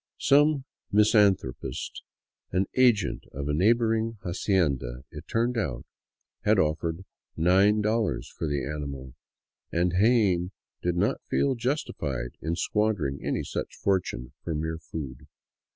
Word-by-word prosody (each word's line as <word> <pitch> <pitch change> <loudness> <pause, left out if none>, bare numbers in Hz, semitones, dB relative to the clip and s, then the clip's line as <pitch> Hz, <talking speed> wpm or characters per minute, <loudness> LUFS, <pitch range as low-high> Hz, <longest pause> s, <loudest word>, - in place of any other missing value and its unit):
Some 145 -1 +4 0.3
mis 105 +2 +4
anthropist, 95 - +1 0.5
an 95 +2 +2
agent 120 -6 +3
of 70 +1 -4
a 75 - 0
neighboring 115 +5 +2
hacienda, 75 - 0
it - - -10
turned 120 +1 0
out, 105 - -3 0.6
had - - +3
offered 80 +3 0 0.3
$9 105 +6 +3
for 80 - -3
the 70 -2 -1
animal, 70 -3 -5 0.6
and 85 +1 +1
Jaen 100 -6 +3 0.3
did 90 0 0
not 100 +5 +1
feel 140 - +2
justified 115 - -2
in 80 +2 -1
squander 105 0 0
ing 70 +1 -5
any - - -1
such - - -4
fortune 90 -10 -1
for 80 - -3
mere 80 +1 -3
food. 70 -5 -7
90 Hz, 125 wpm, -27 LUFS, 75-110 Hz, 0.6 s, Some